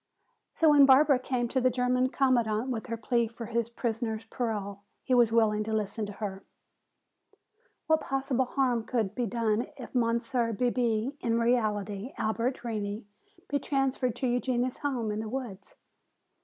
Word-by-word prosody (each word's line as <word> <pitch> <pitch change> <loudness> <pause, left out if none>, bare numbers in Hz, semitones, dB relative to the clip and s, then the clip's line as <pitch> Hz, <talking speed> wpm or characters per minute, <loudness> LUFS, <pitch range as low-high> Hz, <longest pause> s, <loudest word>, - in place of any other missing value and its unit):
So 320 -2 +5
when 285 -2 +7
Barbara 275 0 +6
came 250 -2 -1
to 260 +1 0
the 255 - +4
German 250 +1 +1
commandant 245 -3 +1
with 225 -1 -4
her 230 -1 -3
plea 235 +1 +1
for 230 +1 -8
his 235 0 -1
prisoner's 225 -2 -3
parole, 210 -4 -4 0.2
he 255 - 0
was 240 -2 +5
willing 215 -2 +3
to 220 - -3
listen 215 0 -2
to 205 - -7
her. 195 -2 -5 1.4
"What 315 0 +3
possible 270 -1 0
harm 250 -3 0
could 220 -6 -1
be 240 +1 -1
done 225 +1 0
if 250 - -9
Monsieur 235 0 +1
Bebé, 240 +2 0
in 230 0 0
reality 215 -2 0
Albert 230 +4 -1
Reney, 210 -2 -4 0.4
be 285 - 0
transferred 270 -3 0
to 255 - -1
Eugenia's 245 0 0
home 250 -7 -2
in 210 - -3
the 220 0 -4
woods? 225 -6 -6
235 Hz, 155 wpm, -29 LUFS, 220-255 Hz, 1.4 s, when